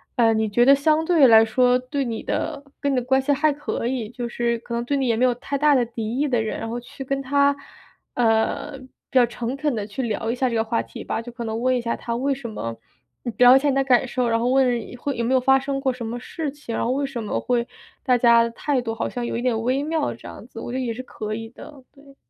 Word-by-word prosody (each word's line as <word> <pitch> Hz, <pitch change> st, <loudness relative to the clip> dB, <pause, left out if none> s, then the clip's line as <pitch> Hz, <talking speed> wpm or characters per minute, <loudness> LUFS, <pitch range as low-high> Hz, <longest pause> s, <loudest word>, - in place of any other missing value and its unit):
嗯， 225 Hz, -2 st, +4 dB
你 220 Hz, -1 st, 0 dB
觉 240 Hz, +4 st, +3 dB
得 275 Hz, -, +8 dB
相 310 Hz, +3 st, +2 dB
对 320 Hz, -6 st, +5 dB
来 225 Hz, -1 st, +7 dB
说 250 Hz, +2 st, +3 dB
对 255 Hz, +3 st, -3 dB
你 230 Hz, -3 st, -4 dB
的 290 Hz, -3 st, -3 dB, 0.2 s
跟 280 Hz, -, 0 dB
你 -, -, +1 dB
的 250 Hz, -, 0 dB
关 265 Hz, +2 st, +2 dB
系 275 Hz, +2 st, 0 dB
还 295 Hz, +2 st, +2 dB
可 285 Hz, -4 st, -4 dB
以， 240 Hz, -4 st, -2 dB
就 245 Hz, 0 st, -5 dB
是 235 Hz, 0 st, -1 dB
可 235 Hz, +1 st, -9 dB
能 235 Hz, -, -1 dB
对 280 Hz, +3 st, -1 dB
你 265 Hz, -, 0 dB
也 230 Hz, -, +2 dB
没 240 Hz, -, 0 dB
有 245 Hz, -1 st, +2 dB
太 275 Hz, +2 st, -4 dB
大 295 Hz, 0 st, +4 dB
的 245 Hz, -2 st, +3 dB
敌 230 Hz, +1 st, -4 dB
意 295 Hz, -, +1 dB
的 245 Hz, -4 st, +1 dB
人， 220 Hz, -, -3 dB
然 225 Hz, -, -4 dB
后 235 Hz, +2 st, -4 dB
去 245 Hz, +3 st, -9 dB
跟 275 Hz, +1 st, -2 dB
他， 280 Hz, +1 st, +2 dB, 0.6 s
呃， 230 Hz, +5 st, +1 dB
比 -, -, -13 dB, 0.4 s
较 245 Hz, -, +6 dB
诚 240 Hz, +2 st, -4 dB
恳 290 Hz, -2 st, -1 dB
地 210 Hz, -2 st, -3 dB
去 210 Hz, +5 st, -5 dB
聊 225 Hz, -1 st, -2 dB
一 -, -, -2 dB
下 255 Hz, 0 st, 0 dB
这 230 Hz, -, -3 dB
个 225 Hz, -, +2 dB
话 230 Hz, +1 st, -1 dB
题 -, -, -9 dB
吧， -, -, -3 dB
就 240 Hz, +1 st, -9 dB
可 235 Hz, 0 st, -7 dB
能 225 Hz, +1 st, -3 dB
问 255 Hz, 0 st, +2 dB
一 245 Hz, -, -2 dB
下 235 Hz, -, -2 dB
他 235 Hz, -, -4 dB
为 275 Hz, +4 st, 0 dB
什 255 Hz, -4 st, -6 dB
么 115 Hz, -, -5 dB, 0.6 s
聊 250 Hz, +1 st, +8 dB
一 -, -, +6 dB
下 290 Hz, +1 st, +1 dB
你 270 Hz, -, +1 dB
的 270 Hz, -, +2 dB
感 260 Hz, -1 st, +3 dB
受， 250 Hz, 0 st, -1 dB
然 230 Hz, 0 st, +1 dB
后 240 Hz, -, 0 dB
问 255 Hz, -3 st, +3 dB
一 -, -, -9 dB
会 280 Hz, +2 st, -3 dB
有 235 Hz, -, -2 dB
没 260 Hz, +3 st, +2 dB
有 -, -, +5 dB
发 265 Hz, +1 st, +4 dB
生 275 Hz, 0 st, -3 dB
过 265 Hz, -2 st, 0 dB
什 245 Hz, -, -7 dB
么 240 Hz, +2 st, -4 dB
事 305 Hz, +4 st, -5 dB
情， 275 Hz, -5 st, -7 dB
然 -, -, -1 dB
后 -, -, -1 dB
为 280 Hz, +2 st, 0 dB
什 245 Hz, -5 st, -5 dB
么 210 Hz, -, -2 dB
会 240 Hz, -1 st, 0 dB, 0.4 s
大 250 Hz, -3 st, +3 dB
家 235 Hz, -1 st, +5 dB
的 230 Hz, -, +1 dB
态 260 Hz, +2 st, -1 dB
度 225 Hz, -2 st, -4 dB
好 230 Hz, -, -2 dB
像 245 Hz, -, -4 dB
有 -, -, -3 dB
一 240 Hz, -, -4 dB
点 230 Hz, -3 st, 0 dB
微 260 Hz, +4 st, 0 dB
妙 315 Hz, 0 st, -1 dB
这 -, -, -12 dB
样 -, -, -10 dB
子， -, -, -10 dB
我 -, -, -6 dB
觉 260 Hz, -, -2 dB
得 -, -, -2 dB
也 235 Hz, -, -2 dB
是 255 Hz, -, -6 dB
可 215 Hz, -3 st, -5 dB
以 225 Hz, 0 st, -7 dB
的， 270 Hz, +2 st, -13 dB
对。 275 Hz, -1 st, -18 dB
250 Hz, 315 characters per minute, -23 LUFS, 235-275 Hz, 0.6 s, 得